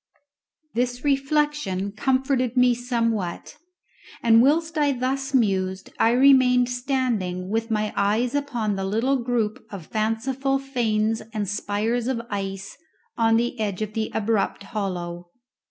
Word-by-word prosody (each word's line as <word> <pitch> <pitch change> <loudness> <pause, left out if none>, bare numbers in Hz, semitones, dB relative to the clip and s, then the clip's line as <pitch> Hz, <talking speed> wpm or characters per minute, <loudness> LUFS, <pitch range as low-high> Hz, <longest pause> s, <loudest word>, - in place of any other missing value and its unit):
This 245 +1 -1
reflection 275 -8 0
comforted 260 +2 0
me 250 0 +5
somewhat, 230 -6 -2 0.7
and 230 -1 +6
whilst 320 +5 +2
I 290 -2 +2
thus 265 +2 -2
mused 190 -5 0
I 225 - +5
remained 250 -1 +5
standing 245 -8 -1
with 225 +2 -1
my 215 -1 -1
eyes 215 +5 +1
upon 245 -8 -1
the 195 - -2
little 225 +8 +1
group 235 -3 -1
of 195 -6 -8
fanciful 255 - -1
fanes 225 -5 0
and 210 -2 -1
spires 210 +4 -1
of 260 -3 -1
ice 195 -1 -4 0.4
on 225 -1 +3
the 240 0 -1
edge 210 -1 -2
of 215 0 -6
the 220 0 -2
abrupt 215 -2 -1
hollow. 180 -5 -4
230 Hz, 130 wpm, -24 LUFS, 205-260 Hz, 0.7 s, and